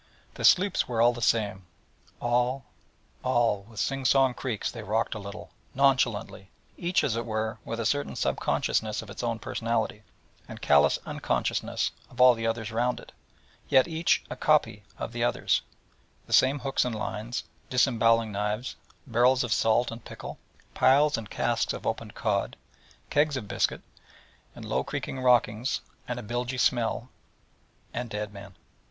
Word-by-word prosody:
The - - -7
sloops 190 +1 +4
were 120 -2 -2
all 120 +1 +5
the 120 - -7
same, 100 -5 +1 0.5
all, 125 +2 0 0.6
all: 115 -5 +1
with 110 -2 -9
sing 135 +3 -1
song 130 0 +4
creaks 120 -4 -3
they 115 - -7
rocked 110 +1 -1
a 110 - -5
little, 100 -1 -9 0.2
nonchalantly: 125 -8 +1 0.3
each, 175 +1 +1
as 115 - 0
it 115 - -1
were, 110 0 -3
with 115 - -5
a 115 - -2
certain 145 +4 0
sub - - -1
consciousness 110 0 0
of 100 - -11
its - - -6
own 115 -2 -1
personality, 115 -2 -2 0.5
and - - -9
callous 70 0 +4
unconsciousness - - -1 0.2
of 125 - -15
all 125 0 +8
the 115 -1 -3
others 115 -1 -2
round 120 +2 0
it: - - -14 0.6
yet 130 - +5
each 165 0 +1
a - - -6
copy 105 - +2 0.2
of - - -5
the 120 0 -2
others: 120 - +1 0.6
the - - -6
same 135 +2 +5
hooks 135 -1 +1
and 125 -3 -2
lines, 110 +2 -4 0.3
disembowelling 115 -3 +3
knives, 105 +4 -2 0.3
barrels 125 +1 +3
of 120 -3 0
salt 115 +2 +2
and 115 0 -8
pickle, - - -9 0.3
piles 145 +3 +4
and 110 -3 -6
casks - - 0
of - - -7
opened - - -3
cod, - - -1 0.5
kegs 145 -1 +2
of 110 -5 -6
biscuit, - - 0 0.7
and - - -9
low - - 0
creaking 135 - -4
rockings, 125 -1 +2 0.3
and 125 0 -3
a - - -7
bilgy 120 +4 -3
smell, 120 0 +1 0.8
and 120 0 -4
dead 105 -1 -4
men. 100 -2 -11
120 Hz, 160 wpm, -27 LUFS, 110-130 Hz, 0.8 s, all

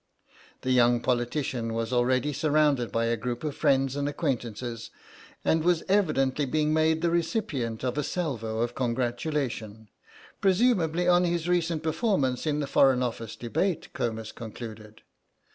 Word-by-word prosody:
The 130 - -1
young 120 -1 +4
politician 120 -1 -1
was 115 +2 -2
already 130 +4 +2
surrounded 145 -4 +2
by 115 0 +1
a 115 0 +1
group 120 +3 -4
of 150 -2 -3
friends 135 -2 +2
and 145 0 -1
acquaintances, 120 -6 -3 0.6
and 160 0 +2
was 175 -1 +2
evidently 150 -8 +2
being 150 +3 +1
made 160 +1 +2
the 170 - +2
recipient 160 - -1
of 130 +3 -1
a - - 0
salvo 115 -12 -2
of 120 +1 -1
congratulation—presumably 140 - -1
on 180 0 +5
his 170 -1 -1
recent 170 -3 0
performances 160 - 0
in 150 0 0
the - - -1
Foreign 135 -2 +4
Office 115 -2 -4
debate, 170 +10 -2
Comus 110 -1 -3
concluded. 110 -1 -9
135 Hz, 140 wpm, -27 LUFS, 120-160 Hz, 0.6 s, on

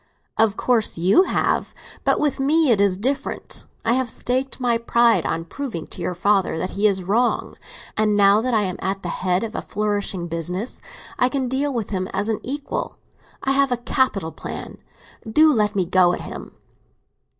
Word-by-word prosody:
"Of 220 -2 +2
course 235 -7 +1
you 190 - +4
have. - - 0 0.3
But - - +2
with 290 -2 0
me 295 +1 +3
it 205 -3 +3
is 195 -2 +2
different. 270 +7 -3 0.2
I 230 - +3
have 260 -1 0
staked 260 +4 -2
my 240 -2 +1
pride 235 0 +3
on 165 0 -2
proving 220 - -5
to - - -7
your 180 - -2
father 195 -1 +1
that 185 +3 -3
he 205 +2 +2
is 190 -2 0
wrong; 230 +7 0 0.4
and 210 -1 +2
now 200 +1 +5
that 250 0 0
I 215 - +3
am 185 -2 -3
at 195 +1 -3
the 175 - -3
head 180 +2 0
of 225 - -5
a - - -3
flourishing 205 -4 -2
business, 180 +7 -4 0.4
I 250 - +4
can 265 -1 -1
deal 275 +3 0
with 230 -6 -3
him 185 -2 -2
as 210 - 0
an 220 - 0
equal. 285 +2 -4 0.5
I 270 - +1
have 275 -1 +3
a 245 - +1
capital 235 -8 0
plan—do 300 - -1
let 210 -3 +1
me 190 -2 +1
go 180 0 +4
at - - -4
him!" - - -8
215 Hz, 185 wpm, -22 LUFS, 190-255 Hz, 0.5 s, now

